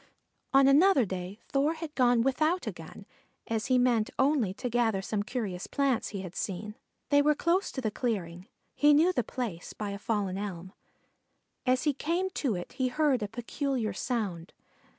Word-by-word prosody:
On 270 0 +6
another 285 - +5
day 185 +1 -5
Thor 285 +3 +2
had 320 -2 -7
gone 245 -4 +3
without 310 +7 +1
a - - -2
gun, - - -11 0.4
as 225 -2 -2
he 255 - +3
meant 240 -3 +2
only 265 -7 +2
to 250 - -4
gather 230 -4 +1
some 210 +1 -1
curious 205 -5 -4
plants 275 -5 0
he 200 -3 -5
had 185 -2 -8
seen. 205 +2 -4 0.4
They 285 -1 +5
were 300 +1 +3
close 345 +6 +1
to 260 - -4
the 220 -3 -1
clearing; 190 -7 -3 0.3
he 295 0 +5
knew 335 +5 +4
the 245 - +1
place 220 -11 -5
by 210 -1 -4
a 200 - -6
fallen 200 -3 -1
elm. 190 -2 -6 0.9
As 255 0 +3
he 295 - +2
came 345 +7 -1
to 265 - -1
it 175 - -6
he 260 - 0
heard 275 -1 +1
a 210 - -1
peculiar 240 0 -2
sound. 195 -6 -3
245 Hz, 180 wpm, -29 LUFS, 205-280 Hz, 0.9 s, On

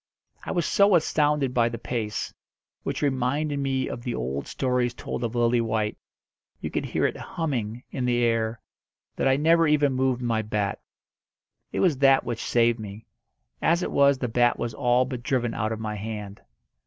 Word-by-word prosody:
I - - -4
was 175 -3 0
so 200 -1 +4
astounded 150 -4 +2
by 120 -2 +3
the 115 - -5
pace 115 -2 -3 0.5
which - - -3
reminded 140 +2 0
me 135 -1 0
of - - -5
the 120 0 -3
old 65 +3 -3
stories 125 -2 0
told - - -5
of 120 0 -3
Lillywhite; 115 -3 +1 0.6
you - - -5
could - - -2
hear - - 0
it - - 0
"humming" 125 -8 -3
in 130 - -2
the 120 -1 +2
air 115 -1 0 0.6
that - - 0
I 135 - +4
never 165 +3 +4
even 145 -2 +3
moved 130 -1 0
my 115 -2 +1
bat. 105 -2 -2 0.9
It - - -1
was 160 -8 +2
that 135 -1 +5
which 120 -2 -4
saved 120 -1 +2
me. 105 +1 -8 0.6
As 170 +2 +2
it - - -3
was 140 -1 +4
the 125 - -2
bat 120 +1 +2
was 120 -1 -3
all 125 +1 +2
but 125 -2 -5
driven 120 -3 0
out 110 +1 -1
of 110 - -3
my 110 -1 -3
hand. 105 -1 -6
120 Hz, 180 wpm, -25 LUFS, 115-135 Hz, 0.9 s, that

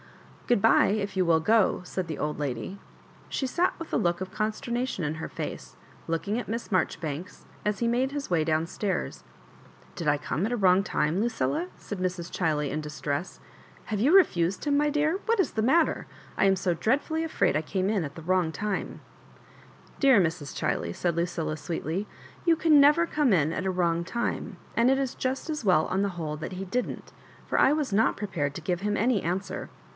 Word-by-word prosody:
Good 240 -5 +2
bye, 225 - +6
if 200 -1 -1
you 185 -1 +2
will 165 -1 +4
go," 215 +5 +3
said 185 -1 -3
the 155 - -4
old 150 - -2
lady. 145 +7 -4 0.5
She 265 - -1
sat 350 +7 +1
with 330 - -8
a - - +4
look 175 -1 +1
of 190 0 -5
consternation 230 - -2
in 150 +1 -2
her 155 - -6
face, - - -6 0.3
looking 200 +7 -1
at 245 - -7
Miss 230 0 -4
Mar 185 -3 +4
joribanks, 160 +4 -7 0.2
as 210 -1 -1
he 235 - +1
made 250 +3 +1
his 285 -1 -4
way 170 -3 +2
down 155 0 +1
stairs. 190 +3 -3 0.4
" - - -25
Did 165 -4 -1
I 145 - +3
come 145 -2 -3
in 200 - +2
at - - -4
a 245 - 0
wrong 190 -1 +4
time, 160 +1 0
Lucilla? 175 - 0
" - - -25
said 205 - -7
Mrs. 180 -2 -3
Chiley, 150 -5 0
in 155 - -2
distress. 150 +2 -4 0.5
Have 210 -2 -2
you 285 +8 +4
refused 190 - +3
him, 290 -1 +2
my 295 +1 +3
dear? 305 +5 +1
What 460 -1 +2
is 380 - +2
the 220 - -1
matter! 310 +8 +2 0.3
I - - +2
am 195 -1 +4
so 185 -2 0
dreadfully 280 - 0
afraid 325 - +1
I 155 - +2
came 185 +4 -1
in 205 -5 +1
at 140 -2 -6
the 165 - -9
wrong 180 -1 +1
time." 210 +3 -3 1.0
Dcar 270 -6 +6
Mra. 170 -4 +3 0.2
Chiley," 85 0 -2
said 175 - -1
Lucilla, 170 -2 -1
sweetly, 165 +5 -3 0.2
" - - -21
you 335 - +6
can 305 -3 +6
never 300 +4 +6
come 295 -6 +1
in 160 -4 +3
at 190 - -2
a - - +1
wrong 170 -2 +1
time; 235 +7 -3 0.2
aud 235 +2 +5
it 270 - +4
is 270 -2 -2
just 265 +4 -2
as 300 -4 -3
well, 180 -6 +4
on 190 - 0
the 200 - +1
whole, 155 -2 -3
that 155 - -6
he 190 +1 -5
didn't— 245 +7 -3 0.4
Ux - - -23
1 295 +3 +4
was 280 -9 -2
not 220 +3 +3
prepared 165 -9 -2
to - - -5
give 175 +2 -2
him 205 0 0
any 230 -3 +2
answer. 185 +4 -3
190 Hz, 215 wpm, -27 LUFS, 165-245 Hz, 1.0 s, bye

